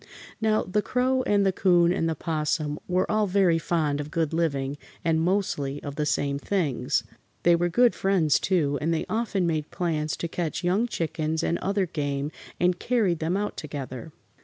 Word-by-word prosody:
Now, 215 -1 +2
the 210 +3 0
Crow 255 +3 +1
and 200 -1 +3
the 195 - +4
'Coon 175 -2 +4
and 165 -3 0
the 160 - -1
'Possum 150 -1 -1
were 185 +1 +2
all 215 -1 +2
very 185 -3 +3
fond 150 -3 0
of 145 - -7
good 160 0 -1
living 145 -4 -1 0.3
and 160 -1 +2
mostly 165 -6 0
of 145 - -5
the 150 0 -1
same 140 -1 0
things. 160 -6 0 0.4
They 175 0 +6
were 175 +1 +1
good 240 +7 +4
friends, 185 -6 +2
too, 150 -7 +1
and 160 +3 0
they 165 - 0
often 215 -4 0
made 155 -3 -1
plans 155 -4 -2
to 170 - -3
catch 165 +1 -3
young 190 +7 +2
chickens 160 -5 -2
and 170 - 0
other 195 0 0
game 145 -3 -2 0.3
and 180 0 +2
carried 210 -9 +1
them 165 +4 0
out 205 +1 -2
together. 140 -1 -6
170 Hz, 185 wpm, -26 LUFS, 150-190 Hz, 0.4 s, They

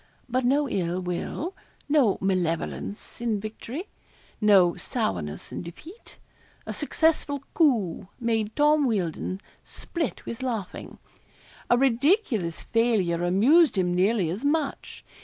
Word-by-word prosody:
But 255 +1 0
no 285 +3 +3
ill 180 -5 -1
will 185 - -4 0.3
no 285 -9 +3
malevolence 185 +3 -2
in 225 -3 0
victory 225 - -6 0.5
no 195 -5 +5
sourness 150 - -3
in - - -4
defeat. 315 - -11 0.5
A - - -4
successful 295 -3 0
coup 225 - +2
made 225 -3 -1
Tom 300 0 +4
Wealdon 185 -3 -2 0.2
split 330 -6 -4
with 230 +2 -6
laughing. 230 -7 -4 0.7
A 240 - +5
ridiculous 255 - +1
failure 205 -8 +1
amused 235 - +4
him 180 -1 +1
nearly 185 -1 +2
as 200 +9 -5
much. 290 0 -2
225 Hz, 115 wpm, -26 LUFS, 185-280 Hz, 0.7 s, no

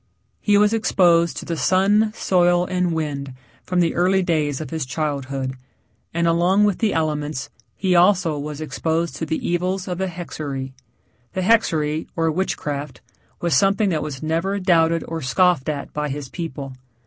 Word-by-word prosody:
He 205 -1 +3
was 210 +1 +4
exposed 175 -6 +3
to - - -5
the 170 - -2
sun, 200 +6 +3
soil, 175 -2 +3
and 180 -1 0
wind 145 -4 -3 0.3
from 180 -1 0
the 170 - +1
early 185 +2 +2
days 150 -5 0
of 155 - -6
his 160 -2 -2
childhood, 135 -1 -3 0.6
and 170 +1 0
along 175 +5 +3
with 205 -3 +2
the 220 -3 +2
elements 150 -3 -2 0.2
he 190 -2 0
also 175 -4 +3
was 150 +1 -6
exposed 160 +2 -2
to 160 - -4
the 160 - -2
evils 180 +2 -1
of 180 -1 -3
the 190 - 0
hexerei. 150 -6 -5 0.6
The 190 - -1
hexerei, 160 -7 +2
or 165 -1 +1
witchcraft, 150 -4 -3 0.4
was 170 -1 +1
something 195 +1 +3
that 160 -4 0
was 140 -1 -6
never 170 +6 -1
doubted 165 -3 +3
or 165 0 -4
scoffed 170 +2 +2
at 145 -2 -4
by 150 0 -2
his 140 -1 -5
people. 140 -5 -6
165 Hz, 165 wpm, -22 LUFS, 150-185 Hz, 0.6 s, was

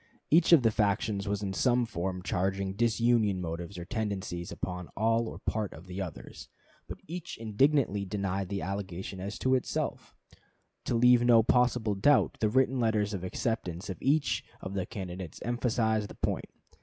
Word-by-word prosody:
Each 165 +3 +5
of 160 -7 +8
the 115 - +4
factions 100 -1 0
was 100 0 -1
in 95 -1 -2
some 120 +3 +2
form 90 -3 -4
charging 95 +2 -1
disunion 115 -2 +2
motives 85 +2 -5
or 85 - -6
tendencies 95 -5 -3
upon 90 -1 -4
part - - -24
or - - -5
all 115 0 +1 0.3
of 80 +4 -12
the 90 +1 -5
others; 80 -10 -8 0.4
but - - -7
each 175 +1 -6
indignantly 115 -1 +2
denied 95 -1 -2
the 100 -1 -3
allegation 95 -1 -5
as 100 +3 -5
to 130 - +1
itself. 130 - -2 0.7
To - - 0
leave 125 +1 +6
no 120 -2 +6
possible 125 -2 +2
doubt, 130 +9 +3
the 110 - +2
written 130 +2 +2
letters 110 -3 +1
of 95 -3 -4
acceptance 95 -3 -3
of 90 - -8
each 145 +2 +1 0.2
of 95 - -6
the 95 -2 -2
candidates 90 -4 -6
emphasized 110 -2 0
the - - -10
point. - - -2
105 Hz, 170 wpm, -30 LUFS, 95-120 Hz, 0.7 s, of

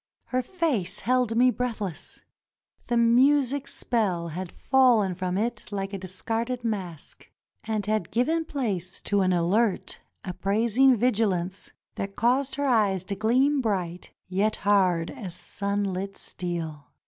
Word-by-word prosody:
Her 255 0 +1
face 265 - -2
held 250 0 +1
me 250 +1 +5
breathless. 220 -10 -4 0.6
The 240 - +1
music 265 +3 +3
spell 190 -12 -1
had 180 +2 -5
fallen 245 -8 +3
from 185 0 -2
it 225 +1 -3
like 195 0 -3
a 195 - -3
discarded 225 +6 -3
mask, 190 -9 -5 0.4
and 215 -2 -2
had 215 +1 -1
given 320 +8 +1
place 200 - -3
to 205 -1 +2
an 185 -1 +2
alert, 185 +5 +1 0.3
appraising 225 +8 +3
vigilance 200 -6 0 0.3
that 195 0 -4
caused 255 +4 +1
her 285 +1 -1
eyes 205 -8 +2
to 200 - -3
gleam 260 +7 +2
bright 180 -6 -2 0.2
yet 200 +4 +1
hard 185 -5 +3
as 200 -11 -7
sunlit 200 -1 -3
steel. 165 -6 -4
210 Hz, 130 wpm, -26 LUFS, 185-245 Hz, 0.6 s, me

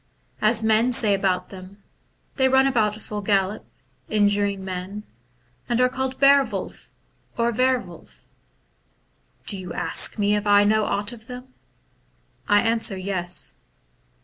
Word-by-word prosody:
As 220 +1 +3
men 220 +3 +3
say 220 -4 +4
about 190 -2 -1
them, 195 +1 -13 0.5
they 265 -1 +3
run 265 +1 +4
about 220 -6 +1
full 210 -1 -6
gallop, 200 0 -1 0.4
injuring 205 -2 +1
men, 190 +3 -6 0.7
and 240 0 0
are 250 0 +4
called 265 0 -4
ber 280 0 +6
wolflf, - - -7 0.5
or 235 0 +1
wer 255 +2 +2
wolff. 175 -9 -13 1.2
Do 200 - +1
you 180 -2 -7
ask - - -1
me 205 0 +1
if 210 0 -3
I 205 0 +5
know 215 +1 +2
aught 205 +3 -2
about 225 -1 -14
them? 250 +1 -10 0.9
I 205 0 +4
answer, 225 -4 0
Yes. 185 -2 -3
210 Hz, 140 wpm, -23 LUFS, 200-240 Hz, 1.2 s, ber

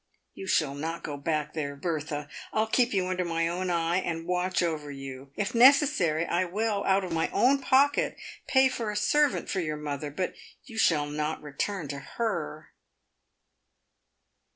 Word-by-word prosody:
You 190 - -8
shall 150 -6 +2
not 160 +4 -4
go 145 - -4
back 150 +1 -2
there, 145 -3 -3
Bertha. 150 -2 -3 0.2
I'll 220 0 +2
keep 240 +2 +2
you 190 -3 +1
under 185 0 -1
my 165 -1 0
own 180 +2 -2
eye, 170 0 +1
and 165 -3 -2
watch 180 +1 0
over 155 -3 -2
you. 135 -1 -8
If 205 - -2
necessary, 245 - +5
I 175 +2 +1
will, 205 +3 -1
out 195 0 +3
of 180 - -5
my 160 0 0
own 275 +3 +3
pocket, 280 +3 +3 0.3
pay 265 0 +5
for 235 -4 -3
a 210 - -3
servant 295 +7 +2
for 190 - -1
your 155 -3 -2
mother; 145 -1 -4
but 180 +6 -3 0.3
you 225 -1 -7
shall 150 -8 +3
not 150 +1 -3
return 150 +4 -3
to 140 0 -4
her." 155 - -4
170 Hz, 170 wpm, -28 LUFS, 150-205 Hz, 0.3 s, necessary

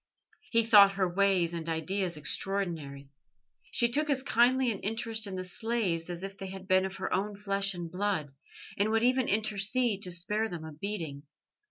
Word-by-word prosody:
He 230 -1 +3
thought 205 -3 +7
her 195 -1 +1
ways 180 -2 +2
and 165 -1 -4
ideas 175 +2 -1
extraordinary. 150 -4 -3 0.6
She 240 - +3
took 300 +3 0
as 265 -2 +1
kindly 255 0 +3
an 200 - -5
interest 225 0 -1
in 190 - -5
the 185 - -4
slaves 185 -3 -1
as 175 +1 -5
if 195 0 -7
they 195 - -5
had 190 0 -9
been 185 0 +3
of 190 - -9
her 190 - -4
own 205 +2 -1
flesh 195 -1 0
and 170 -2 -6
blood, 180 -7 -2 0.5
and 205 +2 +2
would 225 +1 +1
even 255 0 +2
intercede 215 +1 +1
to 185 - -3
spare 210 +6 -1
them 170 -3 -7
a 160 - -8
beating. 160 -4 -4
195 Hz, 185 wpm, -30 LUFS, 175-220 Hz, 0.6 s, thought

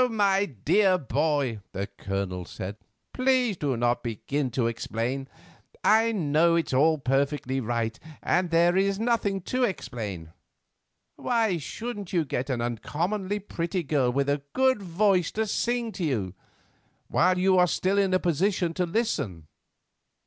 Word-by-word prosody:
my 200 -3 +2
dear 185 - +2
boy," 140 -4 0
the 100 +1 -2
Colonel 95 -2 -4
said, 95 +3 -6 0.4
"please 255 -4 +2
do 140 -7 -1
not 120 +1 +1
begin 130 +4 -2
to 120 0 -1
explain. 115 +3 -2 0.6
I 225 +2 +4
know 165 -3 +2
it's 165 -5 0
all 155 +4 +4
perfectly 135 0 0
right, 115 -1 -2 0.2
and 180 0 +1
there 170 +1 +4
is 195 +1 +2
nothing 220 -4 0
to 255 +8 -1
explain. 110 - -4 0.8
Why 225 -7 +1
shouldn't 205 - -6
you 170 -3 +2
get 130 0 -3
an 125 -3 -1
uncommonly 175 - -2
pretty 180 -3 -3
girl 135 -4 +1
with 140 +2 0
a 145 0 0
good 260 -4 +3
voice 185 -1 +2
to 220 +1 0
sing 235 +2 -1
to 185 -2 -5
you—while 135 - -2
you 185 0 +4
are 180 - +5
still 190 +4 +1
in 195 -1 +2
a 185 - +3
position 175 +1 +1
to 180 +1 -1
listen? 140 - -2
165 Hz, 140 wpm, -26 LUFS, 125-200 Hz, 0.8 s, are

